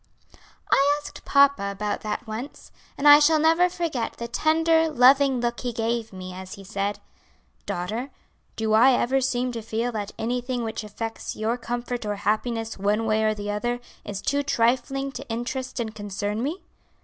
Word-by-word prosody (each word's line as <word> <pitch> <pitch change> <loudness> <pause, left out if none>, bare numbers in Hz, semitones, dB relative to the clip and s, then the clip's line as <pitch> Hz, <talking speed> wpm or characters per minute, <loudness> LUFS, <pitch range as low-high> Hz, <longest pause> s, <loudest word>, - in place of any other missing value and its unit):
"I 285 +2 +4
asked 295 - -10
papa 280 -8 +4
about 205 +1 -3
that 215 +3 -4
once, 225 +5 -7 0.3
and 290 - +2
I 290 0 +10
shall 310 +1 +5
never 330 +3 +4
forget 325 -10 -2
the 235 - -6
tender, 320 +5 +2
loving 270 -1 +5
look 240 0 -1
he 245 - -3
gave 230 0 -2
me 185 -1 -8
as 185 0 -8
he 195 - -12
said: 200 +1 -2 0.7
'Daughter, 215 +10 -3 0.5
do 220 -1 0
I 245 +5 +6
ever 265 +2 +2
seem 250 -1 0
to 230 -1 -5
feel 230 +2 -2
that 210 -3 -4
anything 245 +2 -2
which 220 -1 -4
affects 225 +2 -5
your 220 +2 -1
comfort 240 0 -4
or 210 -1 -2
happiness 225 +2 -2
one 210 +3 +1
way 220 0 +2
or 215 0 +2
the 205 0 -4
other, 240 +4 -2 0.2
is 200 -1 -6
too 285 0 +1
trifling 270 +1 0
to - - -9
interest 255 +3 -4
and 220 -2 -3
concern 205 +1 -3
me?' 310 +9 -3
235 Hz, 175 wpm, -25 LUFS, 215-270 Hz, 0.7 s, I